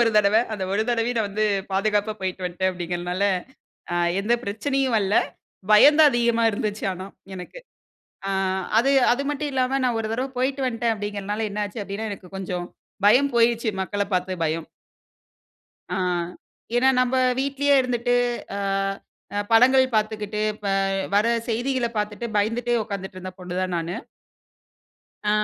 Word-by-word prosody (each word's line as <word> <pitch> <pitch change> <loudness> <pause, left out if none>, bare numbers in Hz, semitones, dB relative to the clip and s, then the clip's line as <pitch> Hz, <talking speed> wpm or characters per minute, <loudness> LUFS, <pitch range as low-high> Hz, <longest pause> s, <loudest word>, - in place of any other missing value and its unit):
ஒரு 230 - +3
தடவ, 205 0 +4 0.2
அந்த 200 -3 -3
ஒரு 205 +2 +2
தடவையும் 240 0 0
நான் 220 - +1
வந்து 210 +2 -1 0.3
பாதுகாப்பா 210 +2 +1
போயிட்டு 185 -1 -3
வன்ட்டேன் 180 +1 0
அப்டிங்கறதுனால, 175 +1 -3 0.7
அ, - - 0 0.2
எந்த 210 +4 +1
பிரச்சனையும் 265 +5 -1
வரல, 200 -1 0 0.6
பயம் 285 +8 +8
தான் 305 -2 +8
அதிகமா 235 -1 +2
இருந்துச்சு 210 0 -3
ஆனா 185 +1 -7 0.3
எனக்கு. 180 - -9 0.7
அ, - - -1 0.5
அது 260 +4 +3 0.2
அது 255 +3 0
மட்டும் 295 0 -2
இல்லாம, 260 0 +1
நான் 245 -2 +1
ஒரு 220 - -3
தடவ 255 +4 -1
போயிட்டு 265 +2 0
வன்டேன் 235 -1 0
அப்டின்கறதனால, 205 +1 -3
என்ன 210 +1 -2
ஆச்சு? 215 +2 -7
அப்டினா, 205 +3 -4
எனக்கு 190 -2 -10
கொஞ்சம் 180 -2 -4 0.4
பயம் 260 +6 +5
போய்டுச்சு, 235 0 +3
மக்களப் 200 +1 -3
பாத்த 185 0 -1
பயம். 160 +1 -2 1.2
அ, 180 - -3 0.8
ஏன்னா 255 +2 +4
நம்ம 255 0 +1 0.3
வீட்டிலயே 280 +1 +2
இருந்துட்டு, 245 -1 0 0.4
அ - - -3 0.8
அ - - +2
படங்கள் 255 +3 +6
பாத்துக்கிட்டு, 215 -1 -1 0.2
ப - - -4 0.5
வர 205 +1 +4 0.2
செய்திகள 245 +2 0
பாத்துட்டு, 210 +2 -2
பயந்துட்டே 230 +4 +1
உட்காந்துட்டு, 190 -3 -6
இருந்த 185 0 -7
பொண்ணு 180 -1 -6
தான் 185 -1 -2
நானு. 170 +1 -3 1.3
ஆ - - +4
215 Hz, 145 wpm, -24 LUFS, 195-245 Hz, 1.3 s, பயம்